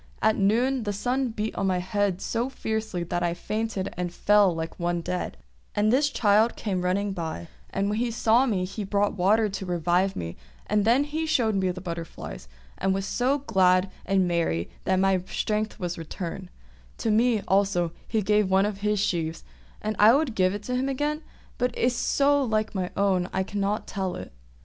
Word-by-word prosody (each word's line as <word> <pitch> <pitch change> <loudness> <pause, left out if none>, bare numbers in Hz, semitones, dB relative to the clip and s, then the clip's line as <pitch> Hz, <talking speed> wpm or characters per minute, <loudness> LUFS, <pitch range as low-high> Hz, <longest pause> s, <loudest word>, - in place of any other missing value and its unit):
At 220 - +3
noon 240 +6 +2
the 205 -2 -2
sun 255 +6 0
beat 220 -1 -3
on 195 - -1
my 185 -1 +1
head 190 0 -1
so 235 +3 -1
fiercely 220 -7 -3
that 175 +1 -2
I 175 -1 0
fainted 210 +1 -3
and 180 0 -3
fell 205 +2 +4
down 170 - -3
like 160 +2 -5
one 175 0 0
dead; 180 +2 -3 0.4
and 215 +2 +3
this 285 +3 +3
child 215 -1 +3
came 190 -4 -2
running 195 +2 0
by, 160 - -5 0.2
and 195 +1 -1
when 210 +2 -1
he 240 0 0
saw 230 +3 +3
me 190 -6 0
he 195 +3 -5
brought 200 +1 +1
water 210 +4 +3
to 195 -1 -5
revive 175 +2 +1
me, 85 0 -5 0.3
and 210 -1 +1
then 240 +5 +4
he 310 +2 -3
showed 240 -8 +2
me 190 -2 +1
the 180 +1 -4
butterflies, 170 - -7 0.3
and 190 0 +1
was 195 0 -2
so 255 +6 +1
glad 185 -3 +3
and 190 -2 +2
merry 165 - 0
that 190 - +2
my 190 0 +3
strength 215 +1 -2
returned; 175 +1 -5 0.5
to 225 - 0
me 225 0 +3
also 190 -3 +2 0.2
he 220 -2 0
gave 210 0 +2
one 190 +1 +4
of 205 -1 -3
his 210 0 0
sheaves, 165 -5 -1 0.4
and 215 0 -1
I 220 +4 +8
would 285 -4 +1
give 185 -1 +2
it 205 - -6
to 250 +3 -2
him 260 +2 0
again, 295 +3 -1 0.4
but 250 0 0
it - - -5
is 245 0 +2
so 285 +2 +2
like 220 -4 0
my 185 -3 -2
own 190 -3 +2
that - - -10
I 190 - +2
cannot 205 +1 -2
tell 190 -3 -3
it." - - -8
200 Hz, 200 wpm, -26 LUFS, 185-220 Hz, 0.5 s, I